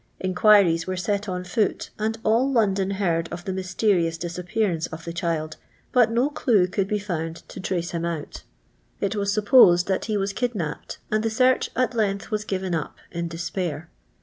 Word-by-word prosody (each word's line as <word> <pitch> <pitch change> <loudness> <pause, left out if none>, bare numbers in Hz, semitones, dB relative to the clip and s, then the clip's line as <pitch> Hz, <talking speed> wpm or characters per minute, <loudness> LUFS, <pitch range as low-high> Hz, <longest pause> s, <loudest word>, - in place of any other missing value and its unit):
Inqniriea 185 -3 +4
were 185 0 -2
set 200 +3 -1
on 180 0 -3
foot, 195 +3 -1
and 220 +1 -1
all 235 +5 +3
London 195 -6 +2
heard 165 -4 0
of 175 - -7
the 190 - -2
mysterious 185 -2 0
disappearance 175 0 -2
of 160 +1 -9
the 170 - -5
child, 165 -3 -2 0.3
but 245 -3 +4
no 245 +6 +1
clue 225 -10 +3
could 190 +1 -1
be 210 - 0
found 165 -5 -5
to - - -9
trace 175 -2 -2
him 170 -1 -3
out. 165 -3 -4 0.6
It 200 +1 -1
was 200 -1 0
supposed 200 -4 +6
that 190 - 0
he 215 -2 -1
was 195 0 -1
kidnapped, 205 -11 -3
asd 215 0 +2
the 225 - 0
search 255 +3 +2
at 255 0 +1
length 205 -2 -1
was 210 -1 -1
given 190 -3 -2
up 160 -3 -3
in 170 -1 -3
despair. 170 0 -4
190 Hz, 180 wpm, -24 LUFS, 170-215 Hz, 0.6 s, supposed